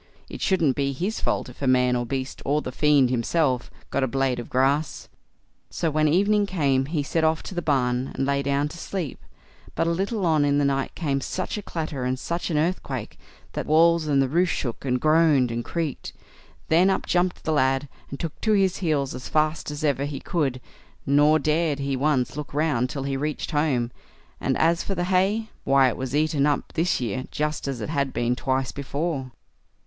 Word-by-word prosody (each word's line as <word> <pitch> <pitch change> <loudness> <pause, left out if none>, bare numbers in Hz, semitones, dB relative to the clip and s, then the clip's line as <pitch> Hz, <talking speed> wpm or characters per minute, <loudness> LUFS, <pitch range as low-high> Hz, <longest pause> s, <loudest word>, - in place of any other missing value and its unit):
It - - -8
shouldn't 165 - +2
be 140 -1 0
his 190 +10 -2
fault - - -1
if 125 - -13
man 125 -2 +3
or 120 -1 -2
beast, 130 +1 -4
or 150 +2 0
the 130 - -4
fiend 145 -2 +3
himself, 130 +1 0 0.2
got 140 - 0
a - - +2
blade 135 -1 0
of 120 - -7
grass. 135 +4 0 0.6
So, 165 - -1
when 155 +1 +2
evening 205 +6 +3
came, 140 -8 +1
he 150 -2 -1
set 160 +3 -1
off 160 0 +2
to - - -7
the 175 - -2
barn, 130 -4 +1
and 135 - 0
lay 140 0 +1
down 140 +1 0
to 170 - -10
sleep; 175 -9 -4 0.6
but - - +1
a 170 - +1
little 195 +3 -1
on 155 -3 +3
in 145 0 +2
the 145 - +2
night 135 -1 -1
came 140 -4 -1
such 185 +6 -3
a 210 - -4
clatter, 155 -8 -4
and 130 +1 -1
such 170 +7 -3
an 155 - 0
earthquake, 150 - -2 0.3
that - - -4
walls 165 +1 +4
and 135 -2 +3
roof 175 +1 +3
shook, 120 -7 -3
and 125 -1 +1
groaned, 155 -4 +4
and 120 0 -2
creaked; 160 -2 -4 0.5
then 175 +4 +4
up 190 - 0
jumped 180 0 0
the 160 - 0
lad, 135 0 +2 0.2
and 140 - -7
took 165 -3 -5
to 220 - +2
his 195 -3 +2
heels 150 -7 0
as 130 - -7
fast 155 0 0
as 150 +1 -5
ever 140 -2 +1
he 145 -2 -5
could; 140 -8 -1 0.5
nor 145 +3 +5
dared 155 0 +1
he 140 -1 -2
once 135 -2 +1
look 145 -1 -6
round 145 -5 +1
till 140 -2 -4
he 135 0 -2
reached 150 +3 -3
home; 140 -6 +1 0.5
and - - 0
as 170 +2 +3
for 195 - -3
the 175 - -1
hay, 195 +5 +1
why 135 -1 +4
it - - -4
was 130 +1 -4
eaten 150 -1 +2
up 145 - -1
this 170 +3 +1
year 130 +2 -3
just 150 -1 -2
as 130 -4 -3
it 105 - -4
had 140 -3 0
been 120 +1 0
twice 130 0 -1
before. 140 -1 -3
145 Hz, 205 wpm, -24 LUFS, 135-165 Hz, 0.6 s, nor